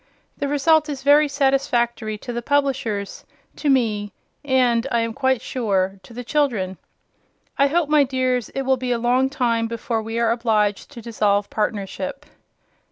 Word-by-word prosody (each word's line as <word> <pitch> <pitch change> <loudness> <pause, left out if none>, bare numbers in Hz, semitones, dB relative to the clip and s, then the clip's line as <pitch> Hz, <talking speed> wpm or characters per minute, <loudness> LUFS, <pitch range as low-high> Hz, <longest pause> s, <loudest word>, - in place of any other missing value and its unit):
The 285 - -2
result 300 +2 +3
is 275 -2 -5
very 295 +2 +5
satisfactory 250 -6 0
to 245 - -4
the 240 - -3
publishers, 250 -7 -1 0.3
to 295 - -2
me, 215 -6 +1 0.3
and 255 -3 +2
(I 235 -1 +2
am 230 0 -2
quite 260 0 0
sure) 195 -6 -1
to 185 - -16
the 245 +2 -7
children. 230 - -1 0.8
I 280 - +5
hope, 325 +2 +1
my 300 -1 +4
dears, 255 -2 -1
it 270 - -1
will 265 0 +2
be 250 0 -3
a 240 - +1
long 250 +3 +2
time 230 -4 0
before 230 0 -3
we 225 +1 -5
are 230 -1 +2
obliged 215 -4 0
to 235 -4 -10
dissolve 205 -3 0
partnership. 220 +7 -3
245 Hz, 165 wpm, -22 LUFS, 225-275 Hz, 0.8 s, very